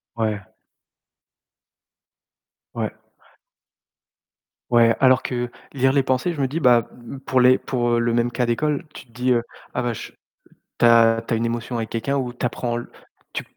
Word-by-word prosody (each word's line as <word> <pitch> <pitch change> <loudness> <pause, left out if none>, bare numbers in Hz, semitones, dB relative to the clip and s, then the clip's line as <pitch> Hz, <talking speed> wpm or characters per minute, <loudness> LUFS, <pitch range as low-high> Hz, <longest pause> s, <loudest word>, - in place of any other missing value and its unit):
Ouais. 110 -3 -1 2.3
Ouais. - - -2 1.8
Ouais, 115 -1 +5
alors 130 -1 +4
que 120 -1 -3 0.2
lire 130 -1 +2
les 140 -1 +3
pensées, 130 +6 0
je 160 - -7
me 135 - +2
dis, 150 +6 -3
bah, 120 -5 +4 0.2
mmh, 125 - -8
pour 130 -1 +1
les 125 +1 +6
pour 120 -2 0
le 120 0 0
même 120 +1 +1
cas 125 0 0
d'école, 145 +5 -1
tu - - -11
te - - -25
dis, 125 +2 -1
heu, 120 -1 +3 0.3
«ah 125 - -1
bah, 120 -1 -1
je - - -8 0.7
tu - - +4
as 115 -1 +5
tu - - -1
as - - +2
une 115 - -1
émotion 120 +1 -3
avec 115 -1 -3
quelqu'un 115 +5 -2
ou 125 -3 -2
tu 125 - -4
apprends 120 -1 -2 0.6
tu» - - -3
120 Hz, 170 wpm, -22 LUFS, 115-130 Hz, 2.3 s, les